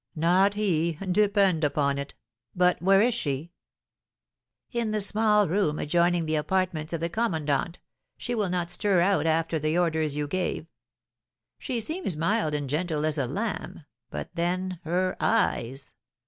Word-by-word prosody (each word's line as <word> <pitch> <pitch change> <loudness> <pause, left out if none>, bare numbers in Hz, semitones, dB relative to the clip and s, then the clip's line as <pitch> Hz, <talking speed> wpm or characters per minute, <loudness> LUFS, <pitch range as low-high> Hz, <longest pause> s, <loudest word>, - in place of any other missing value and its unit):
"Not 180 +5 +3
he, 170 -6 +1 0.2
depend 200 -4 +3
upon 140 -1 +1
it! 140 0 -7 0.4
But 180 0 +2
where 195 +2 +5
is 245 +1 +2
she?" 150 - -3 1.2
"In 235 -2 -1
the 215 0 0
small 210 0 +3
room 165 -3 0
adjoining 170 +2 +1
the 155 0 0
apartments 170 -1 -1
of 165 -2 -3
the 170 - 0
commandant; 165 - -1 0.4
she 245 - -4
will 210 -5 0
not 175 -1 -2
stir 195 0 +1
out 190 -2 +2
after 160 0 +1
the 155 +2 0
orders 160 -4 0
you 150 0 -2
gave. 180 -1 -2 0.9
She 245 -3 -3
seems 315 - -2
mild 165 -2 0
and 145 -1 -3
gentle 155 +1 -1
as 155 -1 0
a 130 - 0
lamb; - - -4 0.2
but 75 -1 -6
then, 180 +1 -2
her 185 +3 0
eyes! 135 - 0
175 Hz, 150 wpm, -26 LUFS, 155-195 Hz, 1.2 s, where